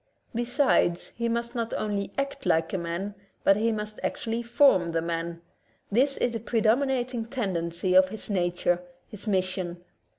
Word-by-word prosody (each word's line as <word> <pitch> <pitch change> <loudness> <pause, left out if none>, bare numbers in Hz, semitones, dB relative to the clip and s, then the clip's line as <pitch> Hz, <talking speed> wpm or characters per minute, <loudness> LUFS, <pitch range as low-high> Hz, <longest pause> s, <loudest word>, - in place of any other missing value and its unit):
Besides, 240 -7 +2
he 235 0 -1
must 235 +1 -2
not 230 -2 -2
only 205 -2 -2
act 275 0 -2
like 165 0 +2
a - - +1
man, 170 +4 -3 0.3
but 195 - +6
he 225 +3 +1
must 210 -1 -4
actually 230 +1 -2
form 235 -7 +4
the 165 0 0
man; 170 0 -3 0.5
this 270 +6 +3
is 245 - +1
the 230 - -3
predominating 245 +2 +1
tendency 185 -7 -1
of 185 0 +6
his 220 +2 -5
na 180 -4 +1
ture, 175 0 0 0.3
his 210 0 -10
mission. 185 -3 -1
210 Hz, 160 wpm, -27 LUFS, 175-235 Hz, 0.5 s, but